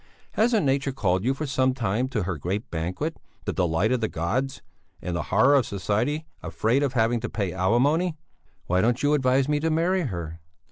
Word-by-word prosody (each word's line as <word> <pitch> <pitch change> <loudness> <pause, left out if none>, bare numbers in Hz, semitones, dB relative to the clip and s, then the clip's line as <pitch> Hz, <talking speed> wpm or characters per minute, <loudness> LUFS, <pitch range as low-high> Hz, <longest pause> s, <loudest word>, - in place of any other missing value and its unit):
Hasn't 220 -5 +2
nature 135 0 +1
called 95 -7 0
you 130 +3 +1
for 155 - -4
some 130 -2 +1
time 115 +1 0
to 110 -7 -1
her 95 -1 -2
great 95 - -3
banquet, 90 - -3 0.3
the - - -1
delight 90 +5 +1
of 130 -2 +1
the 110 - +1
gods 120 +13 -2 0.4
and 90 0 -4
the 85 - -1
horror 125 +9 +5
of 135 -4 +3
society 110 - -1 0.2
afraid 120 +6 0
of 140 -3 0
having 115 0 +2
to 120 - -4
pay 100 -5 -2
alimony?" 140 - +2 0.5
"Why 90 +1 +2
don't 120 +5 +1
you 145 +1 +3
advise 130 -1 +2
me 150 0 +1
to 160 +2 0
marry 170 +4 +1
her?" 85 - -5
125 Hz, 195 wpm, -25 LUFS, 95-145 Hz, 0.5 s, horror